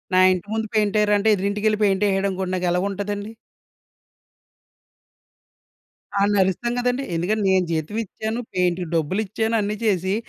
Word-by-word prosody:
నా 185 - +6
ఇంటి 185 +2 -5
ముందు 220 0 -1
పెయింటేరా 210 0 +2
అంటే, 220 +2 +2
ఎదురింటికెళ్ళి 205 +2 0
పెయింటేహాడనుకోండి, 195 -1 +1
నాకెలగుంటదండి? 200 +4 -2 2.9
ఆడ్నరుస్తాం 200 +3 +2
గదండీ. 250 +2 0
ఎందుకంటే, 205 +5 0
నేను 185 -1 +3
జీతం 160 +6 -2
ఇచ్చాను, 220 +4 -4
పెయింట్‌కి 180 -1 0
డబ్బులిచ్చాను. 210 +7 -1
అన్ని 210 +1 -2
చేసి, 190 -2 +1
200 Hz, 105 wpm, -22 LUFS, 185-215 Hz, 2.9 s, నా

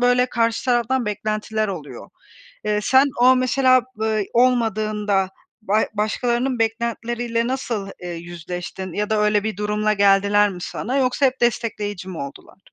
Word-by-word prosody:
böyle 245 0 +3
karşı 230 -2 0
taraftan 245 -1 +1
beklentiler 215 +1 -2
oluyor. 165 -7 -7 0.5
Eee, 210 0 +1
sen 265 +5 +5
o, 255 +1 +6
mesela, 255 0 +3
b 220 -1 0
olmadığında 215 -5 +1 0.3
ba 215 +2 +2
başkalarının 240 +4 0
beklentileriyle 235 +1 -1
nasıl, 235 -6 -3
eee, 180 - -5
yüzleştin 175 +2 -7
ya 210 +1 -2
da 215 - +2
öyle 210 0 +2
bir 220 -3 -2
durumla 210 +1 0
geldiler 200 +1 +4
mi 180 - -8
sana? 255 +5 -3
Yoksa 265 +1 +2
hep 260 -1 -2
destekleyici 210 -5 -1
mi 175 - -6
oldular? 140 +6 -9
215 Hz, 140 wpm, -21 LUFS, 205-240 Hz, 0.5 s, o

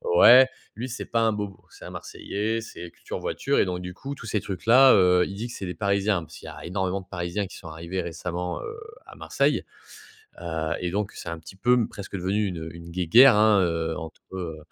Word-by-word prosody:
ouais, 130 +1 +9 0.3
lui, 125 +4 -5
c'est 125 - -5
pas 115 -1 0
un 110 -1 +3
bobo. 105 -2 -5
C'est - - -13
un - - -8
Marseillais, 110 +3 -3
c'est 90 -6 -9
culture - - -7
voiture - - -1
et - - +4
donc, 90 -1 -3
du 90 0 -7
coup, 140 +7 -7
tous 115 - -11
ces 105 -2 -1
trucs 95 +1 -6
là, 130 +3 +8
heu, 90 -1 +5
il 95 - -6
dit 110 +4 -4
que 120 - -9
c'est 95 - -6
des 90 - -5
Parisiens. 100 0 +1
Parce - - -13
qu'il - - -12
y - - -6
a - - -10
énormément 95 +1 -1
de 95 - -18
Parisiens 90 +2 -3
qui - - -12
sont 85 - -11
arrivés 85 +4 -4
récemment, 90 +1 -4
heu, 450 +1 -7 0.3
à - - -13
Marseille, - - +1 0.8
heu 80 -1 -2
et 90 -1 -2
donc 105 +2 -2
c'est - - -8
un 85 - -4
petit 80 +3 -12
peu 120 +5 +3
m 120 -3 +2
presque 100 0 -7
devenu 100 +3 0
une, 90 -3 -4
heu, 80 +1 -7
une 85 0 -10
guéguerre, 100 +9 +6
hein, 105 -1 +5
heu, 80 -2 -1
entre, 80 -1 -8
heu 85 -4 -5
95 Hz, 240 wpm, -25 LUFS, 85-105 Hz, 0.8 s, ouais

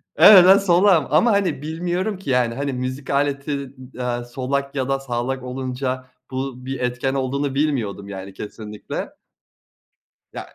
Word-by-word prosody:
evet 190 -4 +9
ben 190 +1 +8
solağım 180 -4 +4
ama 165 - +4
hani 190 -8 0
bilmiyorum 175 +6 -2
ki 185 -7 -8
yani 125 -2 +1
hani 140 0 -2
müzik 130 +2 -5
aleti 140 -1 -1
d 130 -1 -9
aaa, 120 -1 -2
solak 140 +3 -3
ya 130 0 -1
da 135 0 +1
sağlak 130 0 -3
olunca 130 0 -4 0.2
bu 130 -1 -5
bir 135 -1 -4
etken 125 +2 -1
olduğunu 135 +1 -2
bilmiyordum 120 -9 -1
yani 95 0 -7
kesinlikle. 105 +1 -7 1.2
Ya - - -9
135 Hz, 150 wpm, -21 LUFS, 125-145 Hz, 1.2 s, evet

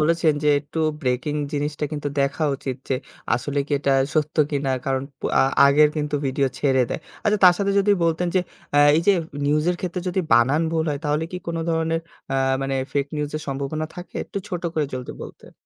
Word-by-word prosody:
বলেছেন, 165 0 +3
যে 150 - +3
একটু 150 +2 -7 0.2
ব্রেকিং 130 +2 -1 0.2
জিনিসটা 150 +1 -2
কিন্তু 145 -1 -2
দেখা 140 +3 0
উচিত 130 -2 -4
যে 135 - +1 0.4
আসলে 145 +4 -2
কি 150 - -6
এটা 140 -1 +1 0.2
সত্য 155 0 0
কিনা? 140 -2 -1 0.2
কারণ 135 -1 0 0.2
প - - -28 0.2
আ - - +6 0.2
আগের 150 +2 +6
কিন্তু 150 -1 -2
ভিডিও 135 +1 +1
ছেড়ে 130 -3 +3
দেয়। - - -3 0.2
আচ্ছা 210 -1 +2
তার 180 -1 +8
সাথে 200 -1 +1
যদি 200 +1 +3
বলতেন 165 +2 +1
যে 185 - +4 0.4
আ - - +6 0.2
এই - - +3
যে 200 - +7 0.3
নিউজ 150 +1 +2
এর 175 - -1
ক্ষেত্রে 180 0 -3
যদি 185 +1 0
বানান 130 +7 +4
ভুল 160 -1 +1
হয় 145 - -2
তাহলে 150 +2 0
কি - - -3
কোন 170 0 -2
ধরনের 165 0 0 0.3
আ - - 0 0.3
মানে 135 0 -1 0.2
ফেক 140 -1 0
নিউজ 150 -1 -2
এর 155 - -5
সম্ভাবনা 140 +3 -3
থাকে? 175 0 -10
একটু - - -5
ছোট 180 -3 -4
করে 155 -2 +1
যলদি 125 -1 -5
বলতেন। - - -12
150 Hz, 205 wpm, -23 LUFS, 140-165 Hz, 0.4 s, তার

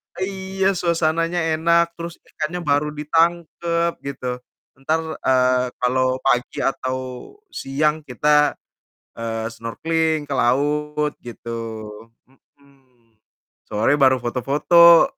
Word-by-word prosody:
Iya 190 0 -1
suasananya 165 0 +1 0.2
enak 170 +1 +4
terus 170 0 -6
ikannya 160 +3 -4
baru 145 +1 +2
ditangkep 170 +2 +1 0.2
gitu. 125 -2 -4 0.4
Entar, 155 +5 0 0.3
eee, 125 -1 +3
kalau 130 +1 +2 0.2
pagi 125 -2 +1
atau 130 -1 -1 0.5
siang 150 - -1
kita, 150 +3 +3 0.7
eee, 115 -1 -3
snorkeling 160 +6 -1
ke 140 - -2
laut 150 +4 +1
gitu, 115 -1 -7 0.7
mhm. 130 -3 -29 0.5
Sore 110 +7 +2
baru 130 -1 +6
foto-foto. 150 - +5
150 Hz, 95 wpm, -21 LUFS, 130-165 Hz, 0.7 s, baru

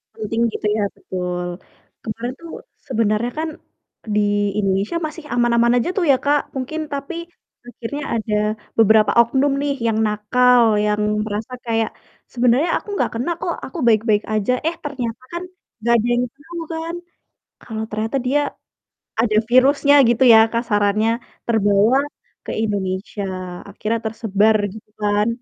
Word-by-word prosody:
Penting 225 +1 -2
gitu - - -5
ya, 210 - +1
betul. 180 -1 -4 0.6
Kemarin 230 +3 -4
tuh 335 - -9 0.4
sebenarnya 230 -1 0
kan 320 0 -1 0.7
di 210 - +4 0.4
Indonesia 195 - 0
masih 310 0 -10
aman-aman 235 0 +3
aja 245 - 0
tuh 360 - +2
ya, 265 - +4
Kak, 290 0 +3
mungkin, 270 +5 -3
tapi 280 +4 -4 0.5
akhirnya 245 +5 -6
ada 220 -1 -1 0.4
beberapa 220 -1 +5
oknum 265 +4 +1
nih 285 -1 0
yang 220 - +1
nakal, 245 +4 +3 0.2
yang 210 0 +1 0.2
merasa 215 +4 -4
kayak, 225 -1 0 0.4
"Sebenarnya 250 +7 +3
aku - - -10
enggak - - 0
kena 250 +9 -1
kok. 345 - -1
Aku - - -9
baik-baik 215 -1 +3
aja." 215 +2 +1 0.2
Eh, 340 - 0
ternyata 255 -5 -4
kan 345 +1 -3 0.4
enggak 235 +2 +2
ada 230 +1 0
yang 245 +1 +2
tau 325 +5 -11 0.2
kan. 330 +1 -4 0.7
Kalau 220 -1 -5
ternyata 220 +4 -2
dia 285 +3 +3 0.8
ada 215 -2 +2
virusnya 275 +3 +5 0.2
gitu 240 +2 +3
ya 220 - +9
kasarannya 215 -2 +1 0.4
terbawa 215 +1 +3 0.5
ke - - -4
Indonesia, 200 -1 -3 0.5
akhirnya 215 +3 -2
tersebar 220 -1 +2 0.2
gitu 220 -1 -13
kan. 210 +1 +2
230 Hz, 140 wpm, -20 LUFS, 210-265 Hz, 0.8 s, ya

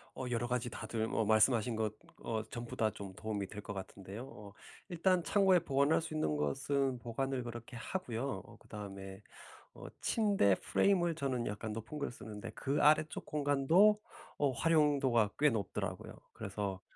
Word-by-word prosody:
어 130 - -4
여러 120 0 0
가지 125 -1 -1
다들 110 0 -3
뭐 115 - 0
말씀하신 110 +2 +4
것 110 -1 -1 0.3
어 110 -1 -2
전부 120 -1 -6
다 110 - +2
좀 100 -2 -8
도움이 105 -2 -3
될 105 +2 -8
것 100 - -6
같은데요. 95 +3 -7
어 105 -7 -11 0.4
일단 180 0 +2
창고에 190 +1 +4
보관할 140 +1 +2
수 160 - -6
있는 155 - 0
것은 130 - 0
보관을 125 +3 -2
그렇게 120 +2 -7
하고요. 125 - -3
어 - - -14
그다음에 95 -1 -8 0.5
어 - - -11 0.2
침대 200 - +3
프레임을 175 -4 +2
저는 130 -5 -1
약간 105 +1 -4
높은 115 +7 -6
걸 140 - -2
쓰는데 110 -1 -8
그 140 +3 0
아래쪽 155 +1 +3
공간도 150 +9 +4 0.4
어 145 -2 +2
활용도가 140 -6 +3
꽤 150 +1 +6
높더라고요. 110 -6 -3 0.2
그래서 100 -2 -4
120 Hz, 330 characters per minute, -34 LUFS, 105-150 Hz, 0.5 s, 꽤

